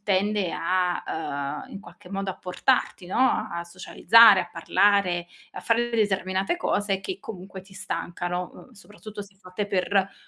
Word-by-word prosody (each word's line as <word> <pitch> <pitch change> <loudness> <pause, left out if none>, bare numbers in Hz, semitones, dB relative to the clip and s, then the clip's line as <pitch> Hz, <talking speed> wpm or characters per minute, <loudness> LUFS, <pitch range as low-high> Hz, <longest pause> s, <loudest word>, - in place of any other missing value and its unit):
tende 200 -2 0
a 180 +1 0
ehm, 140 -3 -4
in 195 - -8
qualche 180 - -15
modo 195 0 -3
a - - -8
portarti, 185 +2 0
no, 215 +3 +1
a 170 - -3
socializzare, 190 +4 +5
a 175 - -6
parlare, 180 0 +2 0.3
a - - -7
fare 235 +1 +1
determinate 195 - 0
cose 205 - -1
che, 190 0 -5
comunque, 190 -2 -9
ti 190 +1 -18
stancano, 175 -1 -4
uhm, - - -15
soprattutto 210 -1 -12
se 200 -1 -11
fatte 190 +1 -5
per, 195 -1 -1
ehm, 195 0 +1
195 Hz, 160 wpm, -25 LUFS, 180-205 Hz, 0.3 s, socializzare